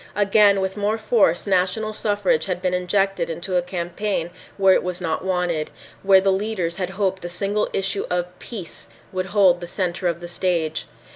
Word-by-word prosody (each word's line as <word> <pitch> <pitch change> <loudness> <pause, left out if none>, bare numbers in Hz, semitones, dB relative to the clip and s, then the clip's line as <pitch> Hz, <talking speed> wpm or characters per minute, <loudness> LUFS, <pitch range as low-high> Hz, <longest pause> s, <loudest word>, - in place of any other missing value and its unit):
Again, 200 -1 +4
with 190 +1 -2
more 210 +2 0
force, 215 -6 +2
national 195 +3 +1
suffrage 205 -7 +1
had 180 -2 -2
been 180 0 -1
injected 195 +2 0
into 175 +3 -4
a 180 - +4
campaign 175 0 -3 0.3
where 195 -1 +5
it - - +3
was 180 0 -2
not 165 -2 -2
wanted, 180 -4 -1 0.3
where 195 -1 +6
the 195 +1 +2
leaders 190 -4 -2
had 185 -2 -2
hoped 190 -1 -1
the 175 - -5
single 200 +4 -1
issue 195 +1 -2
of 180 0 -3
"peace" 190 - -8 0.3
would 185 0 -2
hold 185 -3 +4
the 175 - -6
center 180 0 -2
of 170 -1 -1
the 175 - -7
stage. 170 -3 -1
185 Hz, 185 wpm, -22 LUFS, 175-200 Hz, 0.3 s, where